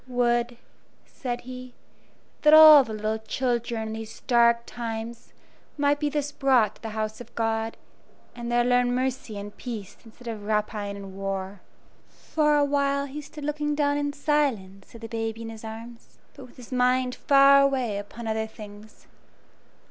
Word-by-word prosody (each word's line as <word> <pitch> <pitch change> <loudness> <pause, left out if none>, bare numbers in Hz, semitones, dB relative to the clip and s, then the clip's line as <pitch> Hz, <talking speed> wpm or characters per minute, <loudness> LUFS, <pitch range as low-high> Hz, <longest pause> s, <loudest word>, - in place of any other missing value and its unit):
"Would," 240 -1 0 0.5
said 245 -2 -5
he, 255 0 -10 0.7
"that 300 0 +7
all 310 -2 +10
the 225 - -8
little 215 +1 -2
children 235 -1 -2
in - - -5
these 220 0 -8
dark 235 -1 +3
times 230 0 -6 0.5
might 290 0 +2
be 295 -1 0
thus 290 0 -2
brought 260 -7 +2
to - - -30
the 225 - -5
house 215 +1 -3
of 240 0 -14
God, 225 0 -1 0.6
and 240 0 -5
there 240 0 +3
learn 245 0 +2
mercy 255 -4 -3
and 205 +1 -8
peace, 220 -6 -7
instead 235 +1 -15
of 220 -3 -5
rapine 210 -1 -2
and 195 -1 -10
war." 195 0 -4 0.5
For 300 -1 0
a 290 - +3
while 280 0 0
he 285 +2 -7
stood 295 +1 -11
looking 295 0 -1
down 285 -1 +1
in 290 0 -1
silence 270 -11 -2
at 230 - -11
the 225 - -6
baby 225 0 -4
in 225 - -6
his 220 0 -11
arms, 230 +1 -10 0.2
but 265 - -12
with 245 - -21
his 250 -1 -13
mind 250 0 +2
far 275 +1 +6
away 260 -7 0
upon 225 +3 -9
other 220 0 -1
things. 215 -1 -13
240 Hz, 170 wpm, -25 LUFS, 220-275 Hz, 0.7 s, all